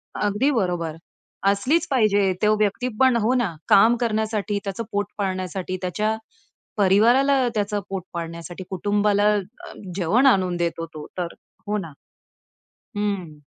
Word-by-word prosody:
अगदी 210 +7 +1
बरोबर 175 - -1 0.5
असलीच 275 - +2
पाहिजे. 205 -6 +3
तो 215 0 +4
व्यक्ती 210 +4 0
पण 260 -2 +5
हो 235 +4 +2
ना, 235 -10 0
काम 225 +4 +6
करण्यासाठी, 215 -3 -1
त्याचं 200 +3 -4
पोट 205 0 0
पाळण्यासाठी, 185 -1 -3
त्याच्या 215 +5 -1 0.6
परिवाराला 245 +7 +4
त्याचं 205 0 0
पोट 190 -2 -4
पाळण्यासाठी, 170 +2 -6
कुटुंबाला 205 +2 +2
अ, - - +1 0.6
जेवण 200 +9 +2
आणून 185 -8 +3
देतो 165 -1 -2
तो, 150 -1 -8
तर 175 -1 -3 0.3
हो 210 - 0
ना. 165 -7 -6 1.1
हं. 190 -7 -3
205 Hz, 130 wpm, -23 LUFS, 185-220 Hz, 1.1 s, काम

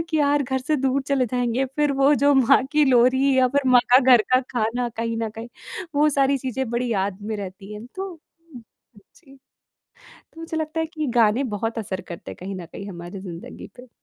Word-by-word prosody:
कि 315 - +1
यार 290 0 +2
घर 265 0 -2
से 300 +4 -1
दूर 270 0 0
चले 265 -3 +1
जाएँगे 245 +2 -1
फिर 295 -1 +2
वो 275 +2 +4
जो 285 0 +3
माँ 265 +1 +5
की 300 0 +4
लोरी 260 +2 +3
या 255 -1 +4
फिर 280 +2 0
माँ 245 -1 +7
का 250 - +8
घर 250 -4 +6
का 255 - +5
खाना 240 +1 -1
कहीं 230 0 -2
न 225 -1 -2
कहीं, 225 +2 -9 0.5
वो 300 +1 +4
सारी 275 -1 +2
चीज़ें 260 -1 -3
बड़ी 240 +1 -1
याद 195 -1 -1
में 215 0 -4
रहती 195 +1 -8
हैं। 215 +3 -9
तो 385 +1 -4
हुँ, 325 -5 -17 0.5
जी। 275 -4 -19 1.0
तो 325 - -14
मुझे 325 -1 -5
लगता 315 +1 -3
है 320 - 0
कि 310 -2 -5
गाने 230 +3 +3
बहुत 225 +2 -3
असर 190 -3 -4
करते 170 - -8
हैं - - -9
कहीं 190 +2 -6
न 180 -2 -7
कहीं 200 0 -8
हमारी 175 +1 -8
ज़िंदगी 175 -3 -9
पे। 250 0 -13
255 Hz, 215 wpm, -23 LUFS, 220-280 Hz, 1.0 s, का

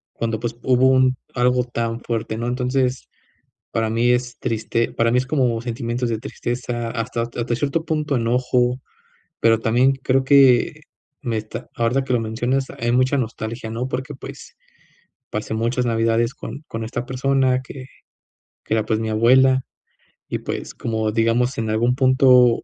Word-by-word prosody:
Cuando 115 -1 -2
pues, 120 -1 -3
hubo 130 0 +4
un 130 0 +4 0.2
algo 125 0 +2
tan 115 -1 -3
fuerte, 115 -2 -3
¿no? 115 +1 -3
Entonces, 125 0 -1 0.6
para 115 -1 0
mí 115 +2 +2
es 125 +2 -1
triste 115 +1 -1
para 115 0 +2
mí, 125 - +3
es 125 0 0
como 125 -6 +1
sentimientos 120 0 -3
de 110 - -1
tristeza, 120 -2 -4
hasta 115 0 -2
hasta 120 0 -3
cierto 145 +5 -1
punto 150 -4 -1
enojo. 125 +1 +1 0.6
Pero 115 -1 +4
también, 125 +4 +3
creo 135 0 +1
que 135 -3 +5 0.4
me 115 -2 -2
está 110 +3 -7
ahorita, 120 +3 +1
que 130 - -2
lo 120 - +3
mencionas, 120 +4 -1
hay 120 +1 0
mucha 130 +3 +2
nostalgia, 115 -1 -4
¿no?, 115 +3 -3
porque 130 +2 -4
pues, - - -11 0.7
pasé 105 +1 -3
muchas 120 +3 0
Navidades, 115 +1 +1
con 145 - -8
con 115 0 -4
esta 120 +2 -4
persona, 130 0 +1
que 130 0 -10 0.8
que 110 - -1
era, 110 -1 +1
pues, 110 -1 0
mi 110 -1 -2
abuela, 130 +4 +4 0.7
y - - -3
pues, - - -5
como 110 -1 -2
digamos, 115 +3 +1
en 110 -1 -2
algún 120 +3 +2
punto 130 -2 +5
120 Hz, 160 wpm, -21 LUFS, 115-130 Hz, 0.8 s, que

